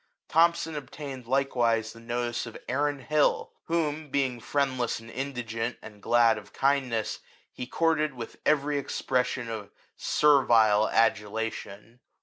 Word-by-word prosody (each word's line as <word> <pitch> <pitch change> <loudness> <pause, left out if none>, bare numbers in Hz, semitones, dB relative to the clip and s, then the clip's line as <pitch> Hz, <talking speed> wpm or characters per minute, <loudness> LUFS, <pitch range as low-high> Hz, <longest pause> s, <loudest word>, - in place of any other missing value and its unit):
Thomson 165 0 +3
obtained 140 -3 -7
likewise 120 -4 +1
the 115 - -13
notice 120 0 -3
of 115 - -8
Aaron 145 +2 0
Hill, 150 +2 +1
whom 155 -2 -1
(being 130 -3 0
friend 135 +1 -1
less 120 -2 -1
and 115 +1 -12
indigent, 120 -3 -3
and 105 -1 -13
glad 115 0 +4
of 105 - -17
kindness) 130 -5 0 0.3
he 125 - -6
courted 155 -1 +1
with 115 -2 -8
every 145 -1 +2
expression 125 -2 -1
of 110 -3 -6 0.3
servile 115 -7 +4
adu 105 -2 +2
lation. 110 +1 -5
125 Hz, 130 wpm, -28 LUFS, 115-145 Hz, 0.3 s, glad